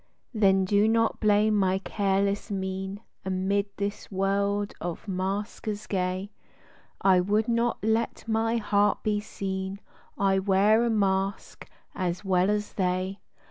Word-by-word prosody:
107 225 Hz, -, -6 dB
Then 195 Hz, -1 st, +5 dB
do 205 Hz, +2 st, +3 dB
not 225 Hz, 0 st, +2 dB
blame 215 Hz, 0 st, +3 dB
my 190 Hz, -2 st, +2 dB
careless 200 Hz, +1 st, 0 dB
mien 190 Hz, 0 st, -4 dB, 0.2 s
Amid 190 Hz, +2 st, 0 dB
this 205 Hz, +1 st, -4 dB
world 200 Hz, +1 st, 0 dB
of 175 Hz, +3 st, -5 dB
maskers 205 Hz, +2 st, -3 dB
gay, 185 Hz, +1 st, -2 dB, 0.7 s
I 190 Hz, -2 st, +5 dB
would 210 Hz, +4 st, +1 dB
not 235 Hz, -1 st, 0 dB
let 220 Hz, +1 st, 0 dB
my 225 Hz, +1 st, +1 dB
heart 205 Hz, -2 st, +2 dB
he 210 Hz, -1 st, +1 dB
seen 195 Hz, -2 st, -4 dB, 0.2 s
— -, -, -31 dB
I 195 Hz, -1 st, +2 dB
wear 200 Hz, +4 st, +4 dB
a 240 Hz, -, +1 dB
mask 195 Hz, -2 st, -1 dB, 0.2 s
as 180 Hz, +1 st, -3 dB
well 185 Hz, 0 st, +3 dB
as 210 Hz, 0 st, -1 dB
they. 185 Hz, +1 st, -1 dB
200 Hz, 140 wpm, -27 LUFS, 190-210 Hz, 0.7 s, Then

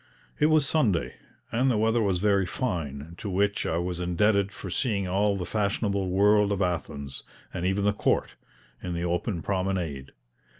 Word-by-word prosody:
It 150 Hz, -, +5 dB
was 155 Hz, -2 st, +4 dB
Sunday, 110 Hz, -, +1 dB, 0.4 s
and 125 Hz, +4 st, +2 dB
the 120 Hz, -, +2 dB
weather 115 Hz, +2 st, +2 dB
was 100 Hz, -4 st, +1 dB
very 100 Hz, -1 st, +2 dB
fine, 80 Hz, -, -3 dB
to 105 Hz, -, -4 dB
which 100 Hz, +2 st, 0 dB
I 80 Hz, -, 0 dB
was 90 Hz, 0 st, -2 dB
indebted 100 Hz, +3 st, +2 dB
for -, -, -7 dB
seeing 100 Hz, -7 st, 0 dB
all 100 Hz, +2 st, +1 dB
the 90 Hz, -, -3 dB
fashionable 100 Hz, -2 st, 0 dB
world 105 Hz, +2 st, +4 dB
of 100 Hz, -, 0 dB
Athens, 75 Hz, -7 st, -3 dB, 0.3 s
and 90 Hz, -, -1 dB
even 100 Hz, +1 st, 0 dB
the 105 Hz, -, +3 dB
Court, -, -, 0 dB, 0.5 s
in 90 Hz, -1 st, -4 dB
the 85 Hz, +1 st, -2 dB
open 85 Hz, 0 st, -2 dB
promenade. 90 Hz, -8 st, -2 dB
95 Hz, 170 wpm, -27 LUFS, 90-105 Hz, 0.5 s, It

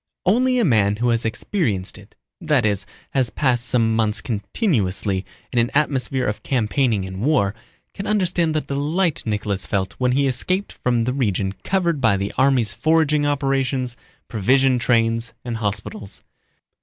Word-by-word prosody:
Only 250 Hz, +7 st, +3 dB
a 240 Hz, -, +3 dB
man 105 Hz, -, +3 dB
who 120 Hz, +3 st, 0 dB
has 115 Hz, -1 st, +1 dB
experienced 110 Hz, -, -2 dB
it—that -, -, -3 dB
is, 100 Hz, -3 st, 0 dB, 0.2 s
has 130 Hz, -4 st, +1 dB
passed 125 Hz, -3 st, 0 dB
some 115 Hz, -3 st, +2 dB
months 110 Hz, -1 st, +1 dB
continuously 100 Hz, -, -1 dB, 0.3 s
in 120 Hz, -, +3 dB
an 120 Hz, +1 st, +2 dB
atmosphere 135 Hz, -3 st, +1 dB
of 105 Hz, -, -2 dB
campaigning 115 Hz, -4 st, 0 dB
and 95 Hz, +1 st, -6 dB
war—can 120 Hz, -, -2 dB
understand 175 Hz, -6 st, +1 dB
the 155 Hz, -, +2 dB
delight 150 Hz, +5 st, -1 dB
Nicholas 105 Hz, -2 st, -2 dB
felt 95 Hz, -1 st, -1 dB
when 125 Hz, -1 st, +2 dB
he 140 Hz, +2 st, +2 dB
escaped 185 Hz, +10 st, -1 dB
from 120 Hz, -2 st, 0 dB
the 125 Hz, +2 st, -1 dB
region 100 Hz, -7 st, 0 dB
covered 170 Hz, -6 st, 0 dB
by 115 Hz, -5 st, +3 dB
the 100 Hz, +1 st, -3 dB
army's 125 Hz, -6 st, +2 dB
foraging 155 Hz, +2 st, +2 dB
operations, 135 Hz, -3 st, 0 dB, 0.3 s
provision 125 Hz, +4 st, +2 dB
trains, 115 Hz, -1 st, +1 dB
and 120 Hz, -2 st, -3 dB
hospitals. 105 Hz, -1 st, -4 dB
125 Hz, 145 wpm, -21 LUFS, 105-145 Hz, 0.3 s, Only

